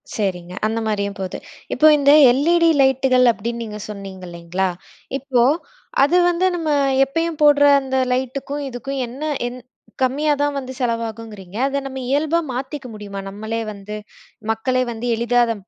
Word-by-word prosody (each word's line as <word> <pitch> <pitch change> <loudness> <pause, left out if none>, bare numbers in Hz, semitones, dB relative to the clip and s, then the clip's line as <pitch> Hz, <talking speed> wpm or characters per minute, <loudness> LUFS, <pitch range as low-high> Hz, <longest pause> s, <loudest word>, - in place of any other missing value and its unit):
சரிங்க. 180 -4 -3
அந்த 225 +1 -1
மாரியும் 200 -2 -2
போது. 190 -1 -4 0.4
இப்போ 310 - +5
இந்த 280 0 +4 0.2
எல்-இ-டி 335 +6 +3
லைட்டுகள் 265 -1 +4
அப்படீன்னு 235 +2 -4
நீங்க 210 -1 -7
சொன்னீங்க 195 -2 -8
இல்லைங்களா? 175 +2 -2 0.5
இப்போ 265 -3 +1 0.6
அது 330 +6 +4
வந்து 350 +1 +1
நம்ம 325 -3 -2 0.4
எப்பயும் 330 +3 -2
போட்ற 290 -1 +6 0.2
அந்த 265 0 -2 0.2
லைட்டுக்கும், 275 +3 -3
இதுக்கும் 265 +2 -4
என்ன 260 +6 -8 0.2
என் 250 +1 -7 0.4
கம்மியா 295 +4 +2
தான் 290 -1 0
வந்து 260 -1 -7
செலவாகுங்றீங்க. 225 -5 -4
அத 280 0 -2
நம்ம 265 -1 -6
இயல்பா 310 +4 +2
மாத்திக்க 265 +2 -5
முடியுமா? 200 -2 -7
நம்மளே 220 +3 -4
வந்து 200 +1 -8 0.6
மக்களே 255 +3 0
வந்து 230 +1 -6
எளிதா 235 +2 +1
அத 230 - -1
250 Hz, 145 wpm, -20 LUFS, 210-275 Hz, 0.6 s, போட்ற